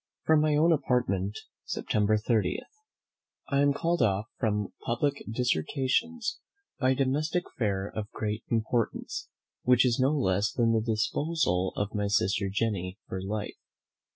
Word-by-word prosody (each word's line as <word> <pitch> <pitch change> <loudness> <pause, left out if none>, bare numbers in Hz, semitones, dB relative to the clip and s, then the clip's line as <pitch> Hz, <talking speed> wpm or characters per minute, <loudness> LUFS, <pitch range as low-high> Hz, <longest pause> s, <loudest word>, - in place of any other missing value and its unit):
From 155 -1 +5
my 155 -1 +3
own 160 +3 +4
Apartment, 120 - +1 0.3
September 105 0 +1
30. 105 -3 0 0.9
I 140 0 +2
am 145 0 +4
called 170 +3 0
off 100 -2 +2
from 105 -3 0
public 140 +4 0
dissertations 130 - 0 0.4
by 130 -2 +3
a 130 - +3
domestic 150 +6 0
affair 100 -4 -2
of 105 -1 -4
great 105 -1 -3
importance, 115 0 -1 0.3
which 125 0 +4
is 120 -1 +2
no 130 +1 +4
less 100 -4 +1
than 115 -2 +2
the 110 - +2
disposal 110 - 0
of 105 0 -2
my 105 -1 0
sister 100 0 +1
Jenny 100 -3 -1
for 95 - -4
life. 105 +2 -4
115 Hz, 140 wpm, -29 LUFS, 105-140 Hz, 0.9 s, From